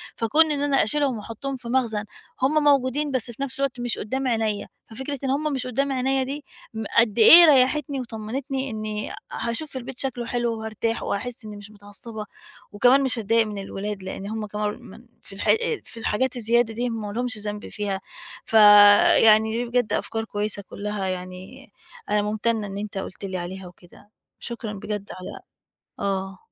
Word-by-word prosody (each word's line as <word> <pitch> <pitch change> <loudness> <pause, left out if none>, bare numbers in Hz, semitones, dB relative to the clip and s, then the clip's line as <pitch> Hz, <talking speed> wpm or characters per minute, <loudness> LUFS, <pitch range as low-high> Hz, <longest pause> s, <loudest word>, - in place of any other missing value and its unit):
فكون 305 +8 +3
إن 285 -1 -1
أنا 285 -1 +3
أشيلهم 275 +1 0
وأحُطّهم 230 +6 -5
في 245 -2 -9
مخزن، 235 -5 0 0.4
هم 300 +4 +3
موجودين 285 0 +2
بس 255 -2 0
في 255 +4 -5
نَفْس 270 -1 -4
الوقت 275 -3 -1
مش 240 -2 -1
قُدّام 260 +5 -2
عينيا، 220 -4 -1 0.2
ففكرة 265 +5 -5
إن 270 - -1
هم 295 +2 0
مش 255 -2 -2
قُدّام 275 +3 -1
عينيا 265 0 +1
دي 280 +2 -6 0.3
م 220 0 -4
قد 230 -1 +4
إيه 335 +10 +10
ريّحتني 280 -1 +3
وطمنتني 255 +4 -4
إنّي 215 -1 -4
آآ، - - -7 0.2
هاشوف 260 +5 -4
البيت 255 0 -8
شكله 250 -3 -2
حلو 235 -1 -1
وهارتاح 220 +1 -3
وهاحس 235 +3 -3
إنّي 210 -1 -8
مش 205 +1 -10
متعصّبة 210 +1 -8 0.5
وكمان 250 +6 +4
مش 255 -3 +1
هاتضايق 225 +1 +2
من 210 -1 -6
الولاد 195 0 -5
لإن 190 +1 -6
هم 220 0 -4
كمان 210 +2 -3
من 230 +1 -14 0.2
في - - -11
الحا 195 - +2
آآ 465 -1 0
في - - -11
الحاجات 255 +4 0
الزيادة 235 0 +2
دي 240 +3 -2
هم 225 -2 -3
مالهمش 245 +3 -3
ذنب 210 0 -5
فيها. 200 -2 -3 0.4
فيعني 215 +1 +7
دي 245 - -1
بجد 240 -3 0
أفكار 225 0 -2
كويسة 205 -1 -3
كُلّها 205 -1 -4
يعني 185 +8 -7 0.4
أنا 210 - +2
مُمتنّة 215 +1 -1
إن 195 0 -6
أنت 205 -1 -5
قُلت 195 +1 -6
لي 185 -1 -4
عليها 180 +1 -6
وكده. 175 +3 -18 0.3
شكرًا 230 -3 -5
بجد 205 0 -5
على 185 - -8 0.6
آه. 195 -1 -2
225 Hz, 175 wpm, -24 LUFS, 210-260 Hz, 0.6 s, إيه